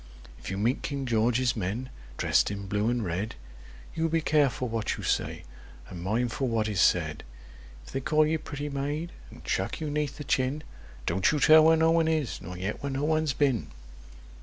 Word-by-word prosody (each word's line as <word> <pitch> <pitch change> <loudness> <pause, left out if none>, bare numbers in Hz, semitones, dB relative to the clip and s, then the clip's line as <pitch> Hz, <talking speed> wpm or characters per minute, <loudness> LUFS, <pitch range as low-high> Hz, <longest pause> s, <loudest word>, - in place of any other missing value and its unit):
If 65 - -8
you 95 - -3
meet 115 +6 +1
King 140 -2 -3
George's 120 +1 +2
men, 110 +5 -3 0.3
dressed - - +2
in 100 -1 -5
blue 105 +3 0
and 120 -3 -1
red, 95 +6 -3 0.6
You 165 0 0
be 165 +1 +2
careful 145 -5 +2
what 115 -2 -2
you - - -7
say, - - -1 0.5
and 90 -3 -8
mindful 120 +7 -1
what 115 -2 0
is 105 -4 0
said. 80 -4 +2 0.6
If - - -12
they 135 - -1
call 155 +3 +3
you 160 +1 0
'pretty 145 -1 -5
maid,' 145 +4 -3 0.2
and - - -14
chuck 95 +4 -1
you 155 -2 -3
'neath 150 -1 -2
the 150 - -6
chin, 135 +2 0 0.4
Don't 95 - +2
you 150 - 0
tell 155 +2 +7
where 160 0 +6
no 160 0 +4
one 165 -1 +3
is, 155 -5 -1
nor 90 +1 -7
yet 95 +4 -4
where 140 - -3
no 135 +2 -2
one's 155 -2 +1
been! 135 -6 +1
130 Hz, 195 wpm, -28 LUFS, 105-150 Hz, 0.6 s, tell